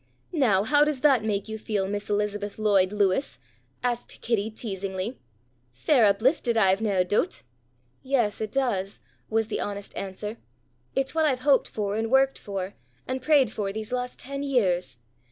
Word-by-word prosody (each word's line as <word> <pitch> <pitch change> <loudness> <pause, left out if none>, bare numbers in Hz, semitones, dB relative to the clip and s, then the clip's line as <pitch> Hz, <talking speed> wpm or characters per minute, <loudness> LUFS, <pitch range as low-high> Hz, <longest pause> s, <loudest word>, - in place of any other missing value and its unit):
"Now 225 - +3
how 290 +6 +5
does 295 -3 -1
that 270 -7 +4
make 205 -2 -1
you 220 0 -5
feel, 205 -3 -1
Miss 205 +1 -4
Elizabeth 205 0 -1
Lloyd 200 -3 +3
Lewis?" 195 - +1 0.5
asked 240 -1 -2
Kitty 220 -2 0
teasingly. 200 0 -4 0.5
"Fair 235 - +3
uplifted, 235 +3 +2
I've 195 -1 +4
nae 200 -4 +2
doot." 205 - 0 0.6
"Yes, 240 -7 0
it 215 -1 -3
does," 200 -8 -1 0.3
was 225 0 +1
the 220 - -3
honest 200 -1 -5
answer. 210 +3 -5 0.6
"It's 270 0 0
what 320 -1 +2
I've 260 -4 +1
hoped 275 0 +4
for 205 -2 -3
and 225 +1 -1
worked 270 +1 +3
for 195 -1 -5 0.3
and 260 0 -2
prayed 275 -4 +4
for 200 -3 -2
these 215 +2 -6
last 250 0 -3
ten 275 +1 -6
years. 185 - +1
220 Hz, 160 wpm, -26 LUFS, 200-255 Hz, 0.6 s, how